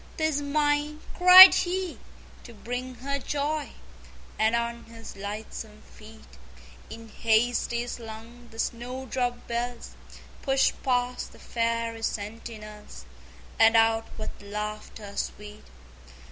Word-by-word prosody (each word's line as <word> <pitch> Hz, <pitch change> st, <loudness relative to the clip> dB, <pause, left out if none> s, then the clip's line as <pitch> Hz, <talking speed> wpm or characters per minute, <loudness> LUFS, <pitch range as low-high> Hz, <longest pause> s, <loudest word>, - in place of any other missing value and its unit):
"'Tis 315 Hz, -3 st, 0 dB
mine," 290 Hz, +1 st, 0 dB, 0.2 s
cried 365 Hz, +1 st, +11 dB
he, 365 Hz, -1 st, -2 dB, 0.4 s
"to 235 Hz, -, -13 dB
bring 245 Hz, +4 st, -5 dB
her 280 Hz, +3 st, -3 dB
joy!" 295 Hz, +2 st, -2 dB, 0.7 s
And 220 Hz, +2 st, +3 dB
on 235 Hz, 0 st, -3 dB
his 225 Hz, -1 st, -11 dB
lightsome 210 Hz, +1 st, -7 dB
feet 220 Hz, 0 st, -16 dB, 0.5 s
In 225 Hz, 0 st, -10 dB
haste 230 Hz, +2 st, +1 dB
he 240 Hz, 0 st, -1 dB
slung 235 Hz, 0 st, -9 dB
the 225 Hz, -, -15 dB
snowdrop 245 Hz, +1 st, -3 dB
bells, 240 Hz, 0 st, -4 dB, 0.5 s
Pushed 270 Hz, 0 st, +1 dB
past 250 Hz, -1 st, -1 dB
the -, -, -16 dB
Fairy 230 Hz, -1 st, -2 dB
sentinels, 210 Hz, -, -7 dB, 0.5 s
And 225 Hz, +1 st, +6 dB
out 225 Hz, 0 st, +3 dB
with 215 Hz, -, -5 dB
laughter 210 Hz, 0 st, -7 dB
sweet. 210 Hz, 0 st, -6 dB
235 Hz, 110 wpm, -26 LUFS, 220-260 Hz, 0.7 s, cried